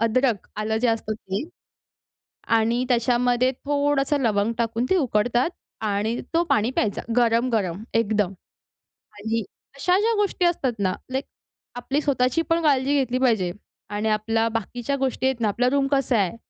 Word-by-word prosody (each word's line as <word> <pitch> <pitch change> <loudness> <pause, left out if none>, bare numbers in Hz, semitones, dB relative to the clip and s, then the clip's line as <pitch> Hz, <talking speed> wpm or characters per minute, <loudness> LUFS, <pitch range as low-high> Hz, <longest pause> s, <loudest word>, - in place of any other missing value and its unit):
अदरक, 230 -1 +1
आलं 215 +1 -1
जे 245 - +1
असतं 225 -1 -1
ते 195 -2 -4 1.2
आणि 230 +2 +2
त्याच्यामध्ये 245 +1 +2
थोडंसं 285 0 +1
लवंग 215 -2 +1
टाकून 230 +1 0
ते 380 - +4
उकडतात 245 -1 +1 0.4
आणि 210 +3 0 0.2
तो 335 +1 +3
पाणी 215 +3 +2
प्यायचा 215 -5 -1 0.2
गरम-गरम 230 -6 +1
एकदम. 210 -4 +1 0.9
आणि 225 +2 -1 0.4
अशा 360 +6 +2
ज्या 455 +2 +2
गोष्टी 405 -3 0
असतात 330 -7 +1
ना, 190 -2 +1 0.2
लाइक 265 +2 -2 0.5
आपली 270 +4 -1
स्वतःची 275 +1 +1
पण 330 0 +2
काळजी 280 -2 +2
घेतली 255 -1 0
पाहिजे 220 -9 +2 0.4
आणि 210 +1 -1
आपल्या 225 +1 +1
बाकीच्या 235 +4 -3
गोष्टी 265 -1 -1
आहेत 260 -3 0
ना, 215 - +2
आपला 245 +5 +1
रूम 280 -1 +2
कसा 270 -3 +2
आहे, 195 +2 0
240 Hz, 150 wpm, -24 LUFS, 220-270 Hz, 1.2 s, ते